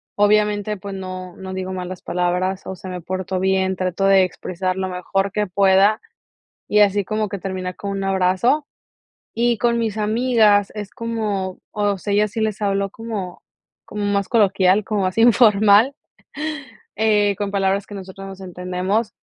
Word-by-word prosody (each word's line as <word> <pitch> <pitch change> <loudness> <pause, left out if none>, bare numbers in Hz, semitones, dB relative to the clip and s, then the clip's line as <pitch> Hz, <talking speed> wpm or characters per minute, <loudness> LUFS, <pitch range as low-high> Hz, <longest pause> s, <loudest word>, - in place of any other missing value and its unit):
obviamente, 210 0 +2
pues 200 0 -8
no 185 -1 -7
no 190 0 -7
digo 190 0 -4
malas 185 -1 -6
palabras, 180 +2 -1
o 190 - -5
sea, 185 0 -8
me 180 - -5
portó 185 +1 -3
bien, 190 0 +1
trato 185 +1 -2
de 195 -1 +6
expresar 185 0 -3
lo 190 0 -2
mejor 195 +2 -1
que 210 +1 -1
pueda 195 +3 +3 0.7
y 210 - +2
así 205 -1 +3
como 215 +1 -1
que 200 - -5
terminar 185 -1 -5
con 200 - -5
un 195 0 -3
abrazo. 195 +10 +1 0.7
Y 235 0 +1
con 235 +1 +1
mis 220 -2 -2
amigas 215 -2 +3
es 210 -2 -6
como, 210 -5 -3
o 205 -1 0
sea, 200 +3 -4
a - - +2
ellas 210 0 +2
sí 225 - -4
les 220 -1 -1
hablo 200 -1 0
como 210 -6 -6 0.4
como 210 0 -5
más 200 -1 0
coloquial, 200 -2 +3
como 210 -2 -1
más 185 +1 -1
informal, 220 0 +5 1.0
eh, 210 -1 +2
con 205 -1 -2
palabras 195 0 0
que - - -10
nosotros 195 0 -9
nos 195 0 -9
entendemos, 185 +4 -2
195 Hz, 170 wpm, -21 LUFS, 185-210 Hz, 1.0 s, de